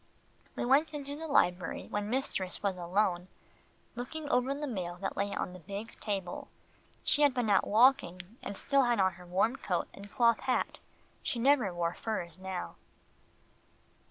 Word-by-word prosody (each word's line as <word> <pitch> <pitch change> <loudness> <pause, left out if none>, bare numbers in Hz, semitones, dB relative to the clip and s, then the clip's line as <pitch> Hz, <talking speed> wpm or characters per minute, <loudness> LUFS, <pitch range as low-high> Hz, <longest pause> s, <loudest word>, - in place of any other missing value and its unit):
We - - -2
went 295 +5 +3
into 285 0 -4
the 320 +2 -6
library, 180 - +2
where 205 - -1
mistress 205 -5 -2
was 200 -2 +1
alone, 180 0 0 0.7
looking 290 +6 -5
over 250 +2 +2
the 290 +2 -2
mail 185 -9 -3
that 195 +2 -4
lay 200 +1 -1
on 180 - -3
the 185 - -9
big 200 +6 -7
table. 195 -4 -3 0.6
She 295 - +2
had 285 -3 +5
been 240 -4 +1
out 195 - +4
walking, 210 -5 +3
and 200 - -6
still 275 -1 +3
had 240 -3 +2
on 190 -1 +3
her 180 0 -13
warm 200 +8 +2
coat 180 -3 -1
and 200 +1 -10
cloth 235 +1 +4
hat. 255 - -1 0.4
She - - -2
never 250 -4 +4
wore 170 -1 -1
furs 175 -6 -4
now. 190 -1 -5
205 Hz, 165 wpm, -31 LUFS, 185-255 Hz, 0.7 s, had